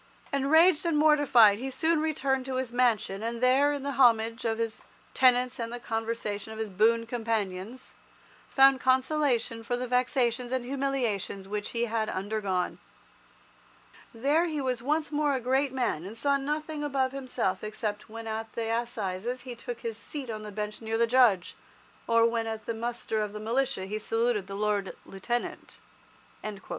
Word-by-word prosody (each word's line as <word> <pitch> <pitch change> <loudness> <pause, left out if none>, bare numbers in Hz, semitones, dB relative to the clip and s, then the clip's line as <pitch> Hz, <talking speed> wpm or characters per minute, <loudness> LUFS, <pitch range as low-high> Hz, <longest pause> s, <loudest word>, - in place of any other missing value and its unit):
Enraged 310 +5 +4
and 335 -3 +1
mortified, 285 -9 +5
he 265 +2 -3
soon 320 +4 +1
returned 275 -4 0
to 260 - -3
his 255 -2 -2
mansion, 225 -5 +1
and 230 +1 -3
there, 260 +4 +4
in 285 -2 -3
the 280 - -2
homage 230 -4 +3
of 225 -1 0
his 225 -1 -3 0.3
tenants 250 0 +3
and 230 0 -3
the 240 - -5
conversation 225 -2 -3
of 220 - -8
his 220 -1 -3
boon 225 +4 +3
companions, 225 -1 -3 0.6
found 270 -1 +6
consolation 260 -3 +1
for 245 +2 -2
the 250 - -3
vexations 250 -1 +1
and 260 -2 -1
humiliations 250 -8 -2
which 205 +1 -3
he 235 0 -1
had 220 -1 -1
undergone. 195 -2 -2 1.3
There 285 +9 +2
he 310 -3 -2
was 255 -3 -1
once 300 +4 0
more 295 -1 +1
a - - -1
great 265 +3 +1
man, 245 -11 -1
and 205 +5 -8
saw 280 +4 +2
nothing 300 +2 -3
above 270 -3 0
himself 265 -2 -2
except 215 -1 -4
when 225 +1 -8
at 220 0 -5
the 225 -1 -2
assizes 235 0 -3
he 250 -1 -7
took 240 0 -7
his 225 -1 -5
seat 270 -1 -6
on 215 -1 -5
the 210 0 -8
bench 210 +1 -5
near 225 0 -2
the 235 - +4
Judge, 230 -7 +3 0.5
or 230 0 +4
when 230 -1 0
at 220 -1 -5
the 230 - -2
muster 230 -1 -3
of 210 -1 -3
the 210 - -6
militia 235 -2 -1
he 210 +3 -4
saluted 225 -2 0
the 195 - -6
Lord 205 -1 -1
Lieutenant." 240 +5 -4
235 Hz, 170 wpm, -28 LUFS, 220-265 Hz, 1.3 s, found